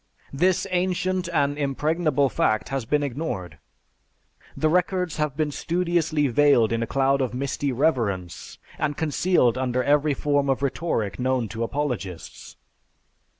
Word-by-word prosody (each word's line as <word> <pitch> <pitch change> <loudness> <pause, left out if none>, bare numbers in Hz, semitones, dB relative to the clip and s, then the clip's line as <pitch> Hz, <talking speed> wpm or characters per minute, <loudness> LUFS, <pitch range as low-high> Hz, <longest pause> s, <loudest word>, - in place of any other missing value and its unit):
This 180 +7 +2
ancient 185 0 0
and 145 -2 0
impregnable 145 +1 +1
fact 110 -3 0
has 135 -3 -2
been 145 +5 +1
ignored. 130 - -4 1.0
The 155 - +2
records 180 0 0
have 150 -3 -2
been 155 -2 0
studiously 170 -2 0
veiled 130 -3 +4
in 115 0 0
a 115 - -2
cloud 135 0 +1
of 125 -2 -2
misty 140 +1 -2
reverence, 115 - -1 0.2
and 145 -1 -1
concealed 150 -5 +2
under 125 -1 0
every 145 +1 +2
form 145 -1 0
of 135 +1 0
rhetoric 135 -8 -2
known 130 -2 0
to 115 - -6
apologists." 115 - -4
140 Hz, 135 wpm, -24 LUFS, 125-160 Hz, 1.0 s, veiled